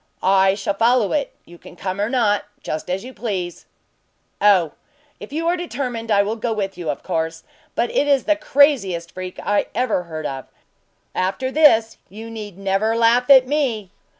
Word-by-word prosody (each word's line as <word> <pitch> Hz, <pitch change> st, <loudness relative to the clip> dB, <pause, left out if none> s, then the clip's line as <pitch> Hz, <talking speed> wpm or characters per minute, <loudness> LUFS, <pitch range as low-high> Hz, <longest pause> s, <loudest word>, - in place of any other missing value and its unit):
"I 190 Hz, 0 st, +4 dB
shall 200 Hz, 0 st, -2 dB
follow 230 Hz, +1 st, +2 dB
it! 285 Hz, -3 st, -1 dB
You 175 Hz, 0 st, -15 dB
can -, -, -14 dB
come 185 Hz, +2 st, -4 dB
or 210 Hz, -, 0 dB
not, 215 Hz, -6 st, +1 dB, 0.2 s
just 155 Hz, +3 st, -4 dB
as 185 Hz, +2 st, -2 dB
you 255 Hz, +1 st, -9 dB
please." 185 Hz, -8 st, -4 dB, 0.7 s
"Oh! 190 Hz, -7 st, +4 dB, 0.5 s
if -, -, -10 dB
you 325 Hz, +3 st, -2 dB
are 345 Hz, -, +2 dB
determined, 250 Hz, -9 st, -4 dB
I 200 Hz, -2 st, +4 dB
will 215 Hz, +3 st, -3 dB
go 230 Hz, +1 st, -2 dB
with 195 Hz, -3 st, -3 dB
you, 170 Hz, -3 st, -5 dB
of 145 Hz, -, -4 dB
course; 165 Hz, 0 st, -3 dB, 0.3 s
but 240 Hz, -, 0 dB
it 290 Hz, -, +1 dB
is 280 Hz, -2 st, +3 dB
the 310 Hz, -, +2 dB
craziest 265 Hz, -, +2 dB
freak 185 Hz, 0 st, -7 dB
I 205 Hz, 0 st, +1 dB
ever 245 Hz, -7 st, +1 dB
heard 155 Hz, -2 st, -6 dB
of. 135 Hz, -2 st, -5 dB, 0.7 s
After 195 Hz, +8 st, -1 dB
this, 230 Hz, -7 st, +4 dB
you 220 Hz, +3 st, -9 dB
need 210 Hz, -4 st, -8 dB
never 195 Hz, +3 st, 0 dB
laugh 235 Hz, +2 st, +3 dB
at 265 Hz, -2 st, +8 dB
me." 250 Hz, -9 st, -1 dB
215 Hz, 180 wpm, -21 LUFS, 185-255 Hz, 0.7 s, at